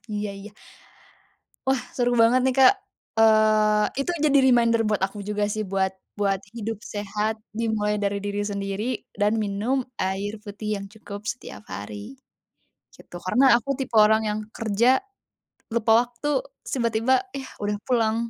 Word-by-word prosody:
Iya 210 Hz, 0 st, -2 dB
iya. 210 Hz, +1 st, -10 dB, 1.2 s
Wah 265 Hz, -1 st, +2 dB, 0.2 s
seru 245 Hz, -1 st, +2 dB
banget 240 Hz, +3 st, +5 dB
nih 260 Hz, -1 st, +2 dB
Kak, 260 Hz, -, +9 dB, 0.5 s
eee, 215 Hz, -1 st, +5 dB, 0.2 s
itu 275 Hz, -, -1 dB, 0.2 s
jadi 280 Hz, -1 st, +5 dB
reminder 235 Hz, -2 st, +4 dB
buat 210 Hz, -, 0 dB
aku 200 Hz, +2 st, -11 dB
juga 210 Hz, 0 st, 0 dB
sih, 215 Hz, -, -2 dB
buat 190 Hz, 0 st, 0 dB, 0.3 s
buat 195 Hz, -2 st, +1 dB, 0.2 s
hidup 225 Hz, -2 st, -4 dB, 0.2 s
sehat 210 Hz, +1 st, -1 dB, 0.2 s
dimulai 215 Hz, -2 st, 0 dB
dari 200 Hz, 0 st, 0 dB
diri 205 Hz, 0 st, -2 dB
sendiri, 200 Hz, 0 st, -3 dB, 0.3 s
dan 205 Hz, 0 st, +3 dB
minum 215 Hz, +6 st, 0 dB, 0.2 s
air 195 Hz, +2 st, -1 dB
putih 210 Hz, 0 st, -7 dB
yang 200 Hz, -, -7 dB
cukup 205 Hz, -2 st, -9 dB
setiap 245 Hz, -, -6 dB
hari, 100 Hz, -, -7 dB, 0.8 s
gitu, -, -, -15 dB
karena 255 Hz, +9 st, +4 dB
aku 240 Hz, +3 st, -8 dB
tipe 260 Hz, -2 st, -4 dB
orang 220 Hz, +1 st, +5 dB
yang 210 Hz, -, -1 dB, 0.2 s
kerja, 225 Hz, +1 st, +1 dB, 0.9 s
lupa 225 Hz, -1 st, +3 dB
waktu 240 Hz, +4 st, -6 dB, 0.3 s
terus -, -, -9 dB
tiba-tiba, 230 Hz, +2 st, +2 dB, 0.2 s
yah 270 Hz, -1 st, -6 dB
udah 205 Hz, 0 st, 0 dB
pulang. 225 Hz, -4 st, +2 dB
215 Hz, 150 wpm, -24 LUFS, 205-235 Hz, 1.2 s, Kak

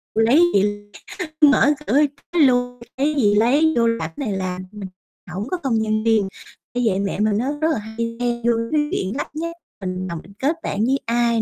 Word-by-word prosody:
Lấy 230 Hz, +7 st, +4 dB
gì 205 Hz, +1 st, +1 dB, 0.6 s
mở 295 Hz, -1 st, +6 dB, 0.2 s
cửa 270 Hz, -, +3 dB, 0.4 s
luôn 245 Hz, -3 st, +3 dB, 0.2 s
lấy 295 Hz, +3 st, +1 dB
gì 210 Hz, -7 st, +3 dB
lấy, 280 Hz, +9 st, +4 dB
vô 230 Hz, 0 st, +4 dB
làm 200 Hz, -9 st, -1 dB
này 240 Hz, -7 st, -2 dB
làm 185 Hz, -1 st, -3 dB
mình 205 Hz, -3 st, -8 dB, 0.4 s
hổng 195 Hz, +5 st, -4 dB
có 365 Hz, -, 0 dB
không 230 Hz, -5 st, +1 dB
gian 215 Hz, 0 st, 0 dB
riêng, 220 Hz, -3 st, +3 dB, 0.5 s
bởi 245 Hz, -, 0 dB
vậy 190 Hz, -2 st, +1 dB
mẹ 200 Hz, 0 st, -2 dB, 0.2 s
á 260 Hz, +5 st, -1 dB
rất 315 Hz, -, +3 dB
là 310 Hz, -, 0 dB
hay 230 Hz, +2 st, -5 dB
chen 240 Hz, -1 st, -1 dB
vô 235 Hz, 0 st, +3 dB, 0.2 s
cái 305 Hz, -1 st, +3 dB
chuyện 190 Hz, +6 st, -2 dB
lắt 290 Hz, -, -5 dB
nhắt, 335 Hz, +2 st, -4 dB, 0.3 s
mình 185 Hz, 0 st, -3 dB
làm 170 Hz, -2 st, -4 dB
mình 195 Hz, -, -16 dB
kết 290 Hz, +5 st, +1 dB
bạn 210 Hz, +2 st, -1 dB
với 270 Hz, +3 st, +1 dB
ai 235 Hz, 0 st, +2 dB
230 Hz, 200 wpm, -21 LUFS, 205-265 Hz, 0.6 s, mở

